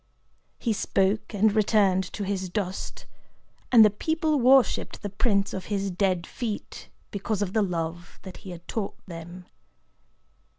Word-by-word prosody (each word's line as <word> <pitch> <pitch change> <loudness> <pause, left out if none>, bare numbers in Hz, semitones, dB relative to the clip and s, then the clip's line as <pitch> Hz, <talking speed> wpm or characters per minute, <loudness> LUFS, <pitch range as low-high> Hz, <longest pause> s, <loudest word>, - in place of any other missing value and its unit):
He 230 - 0
spoke, 195 0 0
and 210 0 +3
returned 205 -3 +3
to 205 - -4
his 190 -1 -2
dust; 190 -1 -4 0.7
and 230 -3 +9
the 210 - +4
people 315 +6 0
worshipped 260 +1 +3
the 205 - -4
prints 200 -1 +1
of 190 - -5
his 200 -2 -2
dead 180 -2 0
feet, 225 -5 -6 0.2
because 205 0 -2
of 190 -1 -4
the 220 - +3
love 170 -2 -3
that 190 -2 -9
he 195 - -11
had 175 -1 -9
taught 215 -3 -3
them. 175 +1 -9
200 Hz, 145 wpm, -26 LUFS, 185-215 Hz, 0.7 s, and